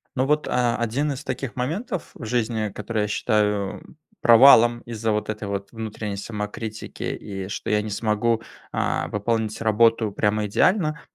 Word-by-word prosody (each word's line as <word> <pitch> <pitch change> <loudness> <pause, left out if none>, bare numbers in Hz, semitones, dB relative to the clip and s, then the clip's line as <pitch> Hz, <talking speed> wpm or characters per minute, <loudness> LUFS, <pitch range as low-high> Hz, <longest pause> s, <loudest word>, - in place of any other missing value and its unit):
Ну 130 +1 +1
вот, 150 +1 +1
а, 120 -1 +1
1 130 +6 -1
из 140 +2 -5
таких 135 -1 -4
моментов 170 - -3
в 115 - -9
жизни, 110 -2 -1
который 110 +1 -3
я - - -1
считаю 105 -2 0 0.4
провалом 120 -1 +7
из-за 115 -1 -3
вот 105 0 -1
этой 105 -1 -4
вот 100 0 -4
внутренней 110 -3 -5
самокритики, 105 +1 -6
и 95 -2 -5
что 100 - -5
я 105 0 +3
не 105 - -5
смогу, 110 +2 0 0.3
а, - - -1
пополнить 110 +1 -1
работу 110 0 +3
прямо 105 +1 0
идеально,- 155 - +2
110 Hz, 155 wpm, -24 LUFS, 105-120 Hz, 0.4 s, провалом